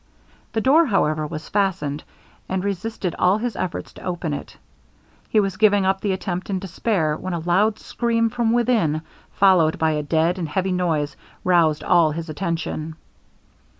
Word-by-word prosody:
The 225 - 0
door, 305 +7 +5
however, 155 -8 +1
was 155 0 -7
fastened, 170 -8 -1 0.5
and 185 0 -1
resisted 200 -2 -3
all 185 +3 +4
his 230 -1 -3
efforts 185 - -4
to - - -13
open 175 -4 -3
it. - - -7 0.7
He 220 - +3
was 195 -2 -1
giving 205 -3 +4
up 190 0 +1
the 205 - 0
attempt 185 -1 -4
in 195 - 0
despair, 185 -3 -1
when 185 +3 -5
a - - -2
loud 190 +6 +2
scream 230 0 0
from 235 -1 +1
within, 225 -11 +1 0.3
followed 185 -5 +4
by 160 0 +2
a 150 -1 -1
dead 165 +4 +1
and 165 -3 -3
heavy 190 +4 -1
noise, 160 -6 0 0.3
roused 165 -4 +3
all 170 -3 +4
his 165 +1 -5
attention. 160 -1 -3
180 Hz, 165 wpm, -22 LUFS, 160-205 Hz, 0.7 s, door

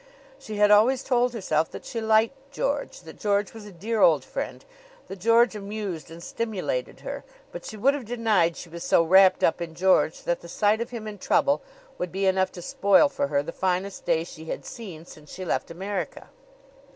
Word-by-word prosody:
She 215 - -7
had 210 0 +4
always 245 +6 +5
told 245 -1 +2
herself 165 -9 0
that - - -10
she 230 - -4
liked 225 +6 +1
George, 280 -4 -2
that 160 -2 -13
George 205 -1 0
was 220 -2 -10
a - - -10
dear 210 +5 -2
old 155 -8 +5
friend, - - -5 0.4
that 195 - -8
George 230 +3 +4
amused 200 -5 -5
and 165 +1 -11
stimulated 230 - -3
her; - - -6 0.3
but - - -8
she 215 - -7
would 270 +7 +3
have 280 -4 -5
denied 215 -8 +1
she - - -8
was 170 +1 -8
so 165 - +4
wrapped 190 +3 +5
up 165 - +2
in 165 -1 -5
George 185 -2 +2
that 175 - -1
the 170 - -11
sight 210 +4 +2
of 235 - -3
him 230 -3 -7
in 205 -2 -7
trouble 280 +9 +2 0.4
would 180 -1 -3
be 195 +1 -1
enough 190 0 +2
to 175 - -9
spoil 200 - +4
for 140 - -1
her 140 0 0
the - - -6
finest 190 +1 -2
day 160 - +1
she 160 -2 -11
had - - -5
seen 180 -9 -9
since 150 -3 -14
she 185 - -7
left - - -1
America. 190 +3 -5
200 Hz, 205 wpm, -25 LUFS, 170-225 Hz, 0.4 s, always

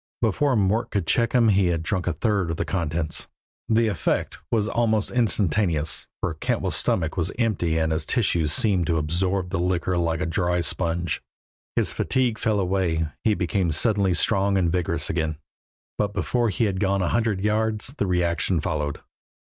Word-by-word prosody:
Before 130 +5 +2
Mort 110 +3 +1
could 100 -5 -1
check 115 +8 +1
him 120 -3 +4
he 95 -2 +3
had 85 -2 -1
drunk 90 0 -2
a 90 - +1
third 100 +1 0
of 85 - -3
the - - -1
contents. 80 -3 -2 0.4
The 115 +1 +3
effect 100 -6 -1
was 110 -3 +1
almost 110 -2 0
instantaneous, 95 -8 +1
for 90 - -2
Cantwell's 80 - -1
stomach 80 -1 0
was 90 +2 0
empty 90 -9 0
and 80 0 +1
his 80 0 -2
tissues 85 -10 +1
seemed 90 -1 +2
to 85 - +1
absorb 90 +4 -1
the 95 - -1
liquor 90 0 0
like 80 -1 0
a 90 - -1
dry 90 +1 0
sponge; 85 0 -1 0.5
his - - +2
fatigue 125 -4 0
fell 110 -3 +1
away, 90 -4 0
he 110 -2 +3
became 90 0 0
suddenly 95 +3 +3
strong 100 +2 +2
and 85 -3 +1
vigorous 90 -1 0
again. 80 -2 -2 0.6
But 105 -1 0
before 120 +2 0
he 110 +4 0
had 95 -3 -1
gone 100 -1 +1
a 85 - 0
hundred 110 -5 0
yards 110 +3 0
the 100 - +1
reaction 90 0 +1
followed. 75 -1 -2
95 Hz, 175 wpm, -24 LUFS, 85-105 Hz, 0.6 s, him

